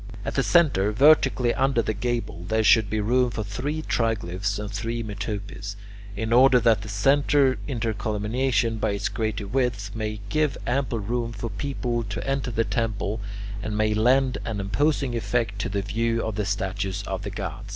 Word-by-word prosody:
At - - -2
the - - +2
centre, 140 - +3
vertically 130 -1 +4
under 135 -3 +2
the 110 - -1
gable, 110 -6 -3
there 110 +2 +1
should 110 -1 +5
be 110 - -1
room 125 +4 +2
for 110 -2 -4
three 145 +10 -3
triglyphs 100 - -1
and 105 0 -5
three 115 +3 -3
metopes, 105 -1 -5 0.4
in 110 +2 -1
order 125 +1 +7
that 115 -3 +3
the 105 - -8
centre 135 +5 +3
intercolumniation, 110 0 -1
by 105 - 0
its 100 - -2
greater 110 -2 -2
width, 110 -3 -1
may 110 -1 -3
give 155 -3 +1
ample 125 -1 0
room 115 +2 -2
for 110 +2 -5
people 120 +1 -2
to 100 +4 -5
enter 135 -2 -1
the 115 -1 +1
temple, 110 -2 -2 0.4
and 105 0 -3
may 110 0 +2
lend 125 +4 +3
an 110 -3 -3
imposing 135 +5 0
effect 110 -2 -1
to - - -2
the 100 0 -2
view 115 +3 0
of 110 - -2
the 105 0 -2
statues 95 0 -2
of 95 -1 -4
the 100 - -4
gods. - - -6
110 Hz, 175 wpm, -25 LUFS, 105-125 Hz, 0.4 s, order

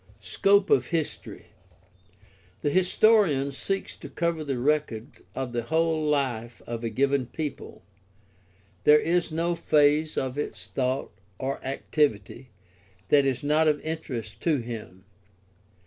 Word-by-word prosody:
Scope 195 - +2
of 130 -2 +4
history. 165 -3 -4 0.6
— - - -31
The 145 - +1
historian 185 -5 +3
seeks 195 +8 -3
to - - -10
cover 170 -2 -1
the 140 -3 -2
record 130 -4 -1
of 130 -2 -4
the 120 - 0
whole 160 +4 0
life 125 -6 -1
of 115 0 -5
a 115 - -1
given 135 +2 +1
people. 150 +2 -6 1.0
There 150 0 +7
is 170 +2 0
no 165 +2 0
phase 150 -1 +2
of 130 +1 -2
its 150 - -5
thought 130 +1 -2 0.3
or 135 +4 -4
activity 130 -3 -1 0.6
that 140 -1 +5
is 135 +2 -1
not 155 +2 +3
of 150 -1 +2
interest 120 -9 -5
to 160 -3 +2
him. 110 -6 -8
145 Hz, 130 wpm, -26 LUFS, 125-160 Hz, 1.0 s, There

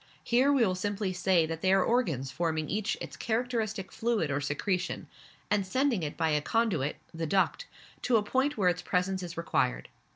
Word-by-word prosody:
Here 255 +4 +3
we 265 -5 +4
will 185 - +1
simply 200 +1 -2
say 180 -2 +3
that 160 0 -5
they 190 - +3
are 195 -1 +5
organs 160 - 0
forming 160 0 -1
each 215 +1 -1
its - - -7
characteristic 220 -4 -2
fluid 225 -10 0
or 140 +1 0
secretion, 180 +6 -2 0.5
and 210 -1 +3
sending 255 +2 +1
it 150 -2 -4
by 160 -1 +1
a 150 0 +2
conduit, 205 - 0 0.2
the 165 0 -3
duct, 195 - +1 0.3
to 250 - +2
the 215 - +4
point 265 +6 0
where 195 -4 +2
its 180 0 -1
presence 185 +1 0
is 170 -2 -7
required. 65 - 0
190 Hz, 190 wpm, -29 LUFS, 165-225 Hz, 0.5 s, are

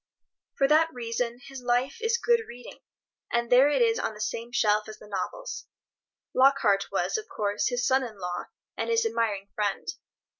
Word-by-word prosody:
For 275 - +4
that 320 +3 +4
reason 235 -1 -3
his 270 -2 -8
life 245 - 0
is 460 +1 +2
good 475 -1 +3
reading, 245 +1 -11 0.5
and 235 0 0
there 260 +3 +7
it 385 +11 +3
is 455 -1 +2
on 220 - -2
the - - -12
same 230 +2 -3
shelf 215 -3 +2
as 215 - -9
the 210 - -14
novels. - - -5 0.7
Lockhart 255 -7 +4
was, - - 0
of 435 - -10
course, 205 0 -1
his 245 -1 0
son 265 +1 +3
in 225 -4 -7
law 180 -1 -4 0.3
and - - -3
his 460 0 +2
admiring 210 - -1
friend. 205 -2 -2
245 Hz, 180 wpm, -27 LUFS, 215-290 Hz, 0.7 s, there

